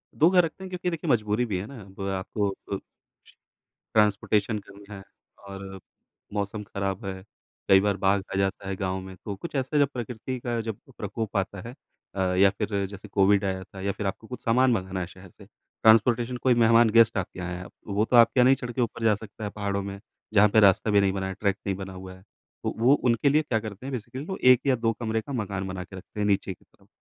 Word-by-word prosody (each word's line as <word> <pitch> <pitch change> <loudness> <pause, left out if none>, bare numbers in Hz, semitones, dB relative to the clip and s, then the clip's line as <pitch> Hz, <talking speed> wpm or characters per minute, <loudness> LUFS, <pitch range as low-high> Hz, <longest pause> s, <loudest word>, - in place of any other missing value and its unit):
2 165 +3 +5
घर 180 -2 +5
रखते 175 +4 -8
हैं 190 - -7
क्योंकि 180 0 -2
देखिए 165 -2 -4
मजबूरी 110 +1 +1
भी 100 -5 -2
है 100 - -5
ना, 130 -7 -10
वो 100 0 -4
आपको 95 +2 -1 0.2
अ - - 0 1.2
ट्रांसपोर्टेशन 105 +1 +2
करना 100 +1 -13
है 95 - -10 0.4
और 95 -1 -8 0.5
मौसम 105 +1 -3
खराब 100 +1 -4
है, 95 -1 -5 0.5
कई 95 0 +8
बार 100 -1 +1
बाघ 95 +1 +2
आ - - -1
जाता 95 0 -1
है 95 - -2
गाँव 95 0 -2
में, 95 0 -10
तो 100 -2 -4
कुछ 150 - -8
ऐसा 135 +3 0
जब 140 - +5
प्रकृति 125 +1 -5
का 120 -1 -2
जब 110 -2 -5 0.2
प्रकोप 105 +1 -4
आता 95 0 -2
है - - -9 0.4
अ, - - -4 0.2
या 100 +1 +6
फिर 100 -2 -1
जैसे 100 +1 -10
कोविड 100 0 +3
आया 95 -1 -2
था 95 0 -11
या 100 0 0
फिर 105 - -5
आपको 110 +3 -5
कुछ 125 - -8
सामान 125 +2 +4
मँगाना 95 -3 -1
है 85 - -3
शहर 95 +1 -14
से, - - -16
ट्रांसपोर्टेशन 120 +2 +2
कोई 130 -2 +5
मेहमान, 115 0 +6
गेस्ट 115 -1 +5
आपके 90 0 -4
यहाँ 90 0 -4
आया, 90 +1 -7 0.2
वो 105 +2 +1
तो 125 - +1
आपके 120 +2 +6
यहाँ 125 - +7
नहीं 135 +1 +6
चढ़ 125 -2 -6
के 125 - -2
ऊपर 115 0 -2
जा 110 -2 +4
सकता 110 +1 -10
है 105 - -2
पहाड़ों 100 -1 -2
में, 100 0 -6 0.3
जहाँ 105 0 +6
पे 110 - +4
रास्ता 100 +1 +4
भी 100 -1 +5
नहीं 95 -1 +2
बना 95 -1 -2
है, 95 - -4
ट्रैक 100 0 -1
नहीं 95 - 0
बना 95 0 -7
हुआ 95 0 -9
है। 95 - -16 0.4
तो - - -1
वो 125 +4 +5
उनके 125 0 +2
लिए 155 +2 +4
क्या 120 -7 -1
करते 110 +2 -8
हैं, 135 - -4
बेसिकली 125 +4 -5
वो 190 +1 -4 0.2
1 125 - -1
या 130 - +4
2 115 -1 0
कमरे 110 -1 -1
का 140 - -8
मकान 100 -4 -3
बना 95 -1 -5
के 95 - -12
रखते 95 +3 -10
हैं 105 - +1
नीचे 100 -1 +1
की - - -25
तरफ। - - -28
105 Hz, 240 wpm, -26 LUFS, 95-120 Hz, 1.2 s, कई